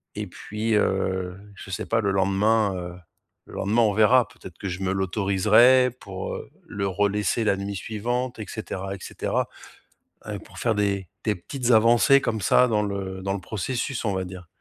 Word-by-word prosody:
et - - -3
puis, 110 +2 -3
heu, 95 -2 0 0.2
je 95 - -11
sais - - -3
pas, 115 0 +1
le 100 - 0
lendemain, 100 +2 +2
heu, 90 -1 -6 0.5
le - - -13
lendemain, 110 +4 +1
on 105 -2 +3
verra. 110 +3 +5
Peut-être 85 -2 -13
que 100 - -5
je 90 +2 -5
me 95 -1 0
l'autoriserai 105 +6 +4
pour, 95 -2 -6
heu, - - -8 0.2
le 100 -1 -3
relaisser 105 +4 0
la 105 -2 +2
nuit 100 +1 -4
suivante 120 +5 -3
et 110 - -4
cetera 95 -3 -5
et - - -9
cetera. - - -2 1.0
Pour - - -14
faire 115 -2 +1
des 100 -3 0 0.2
des 105 -2 +1
petites 125 +7 -3
avancées 120 +4 +6
comme 110 -4 -2
ça 125 - +5
dans 105 -2 +1
le 95 -2 -4
dans 95 - -1
le 100 - -3
processus, 115 +7 -3
on 100 - +1
va 95 0 -1
dire. 90 -1 -10
100 Hz, 185 wpm, -25 LUFS, 95-115 Hz, 1.0 s, avancées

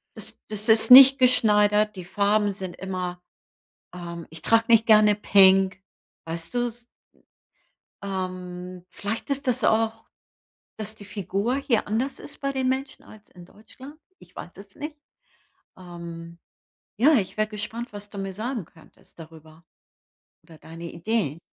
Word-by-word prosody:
das - - -6
das 215 +1 0
ist 220 +3 +6
nicht 270 +1 +10
geschneidert, 210 -4 +3
die 180 -2 -9
Farben 205 +1 0
sind 185 -2 -7
immer, 180 -2 -5 0.7
ähm 170 -1 -8
ich 160 -1 -10
trage 225 0 +3
nicht 230 -1 +4
gerne 215 -1 +5
Pink, 190 -2 +4 0.4
weißt 165 +6 -6
du 245 0 0
s 235 +1 -13 1.2
ähm, 185 -1 -6
vielleicht 205 +9 -6
ist 280 -1 -2
das 250 -2 0
auch, 225 0 0 0.7
dass 215 0 -7
die 205 - -13
Figur 200 +4 -3
hier 260 -5 -1
anders 235 +6 -2
ist 290 - -11
bei 275 -1 -2
den 260 -1 -1
Menschen 265 +1 -4
als 215 -1 -17
in 175 -1 -15
Deutschland? 260 - -15 0.2
Ich - - -20
weiß 175 - -9
es 200 0 -14
nicht. 300 +1 -8 0.8
Ähm, 170 -2 -10 0.6
ja, 290 +8 +4
ich 215 -5 -1
wäre 215 0 +1
gespannt, 220 +2 -6
was 205 0 -10
du 200 - -11
mir 195 -1 -5
sagen 225 - -5
könntest 160 +1 -23
darüber 160 0 -15 0.8
oder 165 -1 -17
deine 165 +2 -11
Idee. 170 -4 -2
205 Hz, 150 wpm, -24 LUFS, 180-230 Hz, 1.2 s, nicht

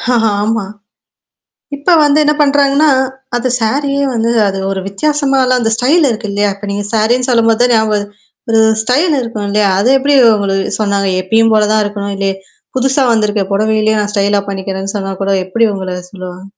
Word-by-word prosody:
ஆமா. 220 -1 0 1.1
இப்ப 285 +6 +1
வந்து 290 +1 +2
என்ன 300 0 +2
பண்றாங்கன்னா, 285 +1 +3 0.5
அது 245 +1 -1
சாரியே 280 +5 0
வந்து 230 0 -1 0.2
அது 195 0 -3
ஒரு 195 - -3
வித்தியாசமாலாம் 270 +2 0
அந்த 225 -1 0
ஸ்டைல் 290 +8 +2
இருக்கு 220 -2 -4
இல்லையா? 205 0 0
இப்ப 200 +1 -9
நீங்க 205 0 -3
சாரி 225 +3 +2
சொல்லும்போது 230 -1 +2
தான் 245 - +2
ஞாபகம். 215 -2 0 0.4
ஒரு 225 - +3 0.2
ஸ்டைல் 290 +8 +1
இருக்கும் 225 -4 -5
இல்லையா? 210 -1 +1
அது 220 +5 +1
எப்டி 280 +2 +1 0.2
உங்களுக்கு 195 -1 -2
சொன்னாங்க 200 -2 0
எப்பயும் 225 +4 +2
போல 210 -1 +3
தான் 215 -1 +2
இருக்கணும். 200 -1 -4
இல்லே 195 0 -1 0.5
புதுசா 265 +2 +1
வந்துருக்க. 210 -1 0
புடவையிலயும் 215 +1 +1
நான் 205 - -3
ஸ்டைல 200 0 +1
பண்ணிக்கிறேன்னு 195 +1 -5
சொன்னா 195 -1 -4
கூட 195 - 0
எப்டி 225 +4 +1
உங்கள 185 -1 -5
சொல்லுவாங்க? 185 -1 -9
220 Hz, 165 wpm, -13 LUFS, 200-255 Hz, 1.1 s, பண்றாங்கன்னா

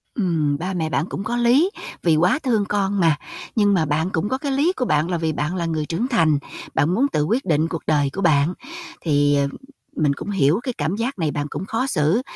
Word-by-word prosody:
Ừm, 160 - 0
ba 185 +4 -3
mẹ 160 -3 -1
bạn 160 - 0
cũng 195 - -4
có 240 +2 -2
lý, 250 +9 +4 0.3
vì 165 -3 +4
quá 180 - +3
thương 225 -6 +1
con 200 -1 0
mà. 165 -4 +4 0.4
Nhưng 205 -2 +3
mà 165 -4 +2
bạn 155 +4 0
cũng 180 +2 -1
có 260 - 0
cái 280 0 -3
lý 290 +7 +2
của 250 - -1
bạn 155 -3 +1
là 175 - 0
vì 160 -1 -1
bạn 150 +5 -2
là 170 - -2
người 160 -2 -1
trưởng 170 +11 -2
thành, 165 - +2 0.3
bạn 145 - +2
muốn 255 +8 +2
tự 150 - +1
quyết 230 - 0
định 160 -2 +2
cuộc 165 -2 -4
đời 145 -3 +2
của 195 - -3
bạn. 155 0 +3 0.5
Thì, 145 -2 +2
ờ, 140 -1 +2 0.5
mình 150 -3 +2
cũng 140 - -7
hiểu 165 -2 +2
cái 255 - -3
cảm 175 +6 -1
giác 235 +1 -3
này 155 -3 0
bạn 145 0 -3
cũng 190 - -5
khó 230 +5 -1
xử, 160 - +2
170 Hz, 245 wpm, -22 LUFS, 155-215 Hz, 0.5 s, lý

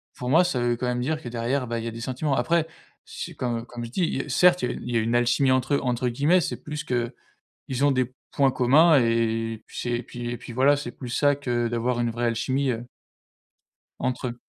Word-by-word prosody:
pour 125 - -4
moi 165 +6 +6
ça 175 -8 -1
veut 120 0 +1
quand 125 - -3
même 125 0 -1
dire 155 +5 -1
que 125 - -7
derrière, 120 +3 -1
bah, 115 -1 -3
il 115 - -5
y - - -3
a - - -3
des 115 - -8
sentiments. 130 +3 -1
Après 160 +6 +1 0.4
c'est - - -7
comme 120 -2 -2
comme 120 -1 -7
je - - -8
dis, 160 +2 -1
heu: - - -11
«Certes 180 0 +4
il 125 - +1
y - - -4
a - - -6
il 125 - -6
y 120 - +2
a - - +4
une 115 +2 0
alchimie 120 +3 +3
entre 130 +2 +1
eux» - - +1
entre 125 -1 0
guillemets, 145 +9 +3
c'est - - -4
plus 150 0 -5
qu'ils 120 -2 -4 0.5
ont 145 - +4
des 130 -2 0 0.2
points 140 -1 +3
communs 145 +6 +5
et 115 -1 0
puis - - -12
c'est 120 - -2
et 120 +1 -1
puis 120 +1 -6
et 120 - -4
puis 120 - -10
voilà, 135 +4 +4
c'est 145 - -5
plus 125 - -9
ça 145 +4 +3
que 120 -4 -1
d'avoir 120 +1 -1
une 120 -1 +1
vraie 120 +1 -2
alchimie, 130 +4 0
heu 120 0 -4 1.1
Entre 130 0 -2
eux. 120 0 -8
125 Hz, 250 wpm, -25 LUFS, 120-140 Hz, 1.1 s, moi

